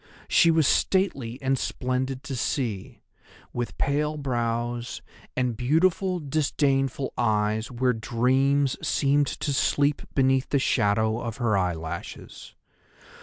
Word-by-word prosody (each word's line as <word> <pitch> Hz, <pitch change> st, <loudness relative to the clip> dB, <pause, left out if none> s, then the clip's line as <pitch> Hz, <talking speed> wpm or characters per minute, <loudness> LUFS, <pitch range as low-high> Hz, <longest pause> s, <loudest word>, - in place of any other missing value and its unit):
She 170 Hz, -, +5 dB
was 160 Hz, -3 st, +4 dB
stately 140 Hz, -12 st, +1 dB
and 135 Hz, 0 st, +1 dB
splendid 130 Hz, +2 st, -2 dB
to 135 Hz, -, -5 dB
see, 115 Hz, -6 st, -3 dB, 0.5 s
with 120 Hz, -1 st, -4 dB
pale 150 Hz, +2 st, 0 dB
brows 120 Hz, -3 st, -2 dB, 0.3 s
and 125 Hz, -2 st, 0 dB
beautiful 175 Hz, -, +1 dB
disdainful 140 Hz, -3 st, 0 dB
eyes 110 Hz, 0 st, +1 dB
where 125 Hz, +1 st, +1 dB
dreams 130 Hz, +4 st, +1 dB
seemed 145 Hz, 0 st, +2 dB
to 145 Hz, -, -2 dB
sleep 145 Hz, +2 st, +1 dB
beneath 130 Hz, -1 st, +2 dB
the 140 Hz, -, +2 dB
shadow 110 Hz, -3 st, +1 dB
of 115 Hz, -2 st, -5 dB
her 115 Hz, -5 st, +1 dB
eyelashes. 85 Hz, -4 st, -4 dB
130 Hz, 115 wpm, -26 LUFS, 115-140 Hz, 0.5 s, She